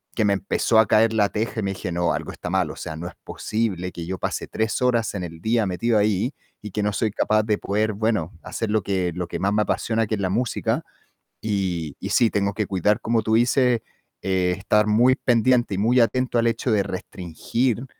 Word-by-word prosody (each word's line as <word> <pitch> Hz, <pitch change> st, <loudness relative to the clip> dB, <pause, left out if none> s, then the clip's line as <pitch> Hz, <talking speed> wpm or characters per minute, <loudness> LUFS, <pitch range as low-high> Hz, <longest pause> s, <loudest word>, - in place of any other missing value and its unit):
que 110 Hz, -, +2 dB
me 100 Hz, -, +3 dB
empezó 100 Hz, +3 st, +2 dB
a 110 Hz, -, +5 dB
caer 110 Hz, +2 st, +4 dB
la 105 Hz, -2 st, +3 dB
teja 110 Hz, +1 st, -2 dB
y -, -, -4 dB
me 95 Hz, -, -1 dB
dije: 90 Hz, -2 st, -5 dB
"No, 85 Hz, 0 st, +1 dB
algo -, -, -4 dB
está -, -, -6 dB
mal, -, -, 0 dB
o -, -, -9 dB
sea, 80 Hz, -, -6 dB
no 85 Hz, +2 st, -5 dB
es -, -, -9 dB
posible 95 Hz, -5 st, -2 dB
que 85 Hz, -1 st, -7 dB
yo 95 Hz, +1 st, -4 dB
pase -, -, -3 dB
3 110 Hz, +3 st, -1 dB
horas 120 Hz, -4 st, +1 dB
en 90 Hz, -3 st, -4 dB
el 85 Hz, -1 st, -8 dB
día 110 Hz, +3 st, +1 dB
metido 110 Hz, +5 st, +1 dB
ahí 105 Hz, +5 st, +1 dB, 0.3 s
y 105 Hz, -2 st, -8 dB
que 105 Hz, +1 st, -2 dB
no 105 Hz, -, +1 dB
soy 110 Hz, +1 st, 0 dB
capaz 110 Hz, +1 st, +2 dB
de 105 Hz, -1 st, +1 dB
poder, 105 Hz, +1 st, 0 dB
bueno, 105 Hz, -5 st, -1 dB
hacer 115 Hz, -, -4 dB
lo 110 Hz, -1 st, +2 dB
que 95 Hz, -2 st, -1 dB
lo 90 Hz, -1 st, -4 dB
que -, -, -5 dB
más 100 Hz, +1 st, +1 dB
me 105 Hz, -, +2 dB
apasiona, 110 Hz, +1 st, 0 dB
que 110 Hz, -, 0 dB
es 100 Hz, -, -4 dB
la 95 Hz, -, 0 dB
música", 120 Hz, +3 st, -1 dB, 0.6 s
y 90 Hz, -8 st, -2 dB
y -, -, -5 dB
sí, 115 Hz, -2 st, +4 dB
tengo 100 Hz, 0 st, 0 dB
que 105 Hz, 0 st, -1 dB
cuidar, 100 Hz, +4 st, +1 dB
como 115 Hz, 0 st, +1 dB
tú 110 Hz, +1 st, +1 dB
dices, 120 Hz, 0 st, +3 dB, 0.4 s
eh, 90 Hz, -1 st, +1 dB
estar 105 Hz, +1 st, +2 dB
muy 120 Hz, +5 st, +4 dB
pendiente 120 Hz, -3 st, +2 dB
y -, -, -3 dB
muy 120 Hz, +5 st, +3 dB
atento 125 Hz, +2 st, +1 dB
al 115 Hz, -, +2 dB
hecho 115 Hz, +1 st, 0 dB
de 100 Hz, -2 st, +3 dB
restringir 100 Hz, +7 st, -3 dB
105 Hz, 230 wpm, -23 LUFS, 95-115 Hz, 0.6 s, a